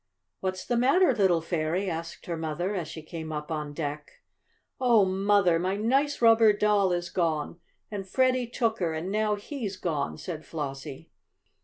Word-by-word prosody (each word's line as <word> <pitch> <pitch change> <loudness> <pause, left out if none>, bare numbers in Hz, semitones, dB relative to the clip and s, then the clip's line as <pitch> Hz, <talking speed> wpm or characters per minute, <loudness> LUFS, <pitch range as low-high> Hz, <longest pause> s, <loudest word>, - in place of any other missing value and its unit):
"What's 185 0 -3
the 240 - 0
matter, 275 +6 +4
little 190 -7 +3
fairy?" 165 +3 -1
asked 165 -1 -5
her 170 - -3
mother, 165 +4 -2
as 175 -5 -3
she 160 0 -8
came 160 0 -7
up 150 +1 -5
on 150 -2 -3
deck. 150 -1 -5 0.7
"Oh, 235 -6 +5
Mother, 190 -2 +3
my 185 +3 0
nice 265 +6 +1
rubber 225 -2 +7
doll 205 -2 +2
is 175 0 -2
gone, 165 -1 -1 0.3
and 195 -2 -5
Freddie 255 0 +2
took 230 -1 -1
her 165 -3 -1
and 170 +4 -4
now 215 0 +1
he's 205 -2 -5
gone," 155 -6 -2
said 160 -4 -6
Flossie. 140 -1 -6
185 Hz, 165 wpm, -27 LUFS, 160-215 Hz, 0.7 s, rubber